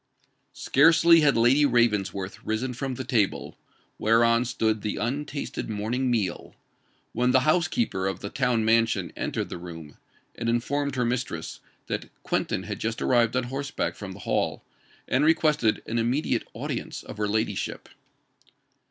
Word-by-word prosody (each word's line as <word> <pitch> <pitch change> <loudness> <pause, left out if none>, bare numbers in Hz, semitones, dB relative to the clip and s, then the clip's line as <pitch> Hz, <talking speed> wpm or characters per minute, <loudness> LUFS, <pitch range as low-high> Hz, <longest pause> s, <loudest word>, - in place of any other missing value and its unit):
Scarcely 165 +3 +5
had 145 -5 +3
Lady 125 +6 +4
Ravensworth 105 -6 +1
risen 120 +4 -2
from 130 +1 -4
the 130 - -4
table, 110 -7 0 0.4
whereon 115 +2 +3
stood 110 -3 0
the 105 - -2
untasted 140 +2 -3
morning 115 +5 -1
meal, 110 -6 -2 0.6
when 125 +2 +1
the 130 +1 +4
housekeeper 155 - +1
of 95 -2 -3
the 100 - -6
town 125 -4 +1
mansion 115 0 +2
entered - - -3
the - - -6
room, 80 -4 -10 0.4
and 115 0 -3
informed 140 +4 -1
her 125 -1 +1
mistress 125 +1 -3 0.3
that - - -4
Quentin - - -1
had - - -5
just 115 +1 -2
arrived 120 -2 +2
on 125 - +1
horseback 135 +3 -3
from 100 -2 -7
the 100 - -12
Hall, - - -1 0.4
and 130 +3 +2
requested 150 -8 +2
an 115 +1 -1
immediate 125 +6 0
audience - - -5
of - - -9
her 105 0 0
ladyship. 110 +1 -2
120 Hz, 145 wpm, -26 LUFS, 110-135 Hz, 0.6 s, Scarcely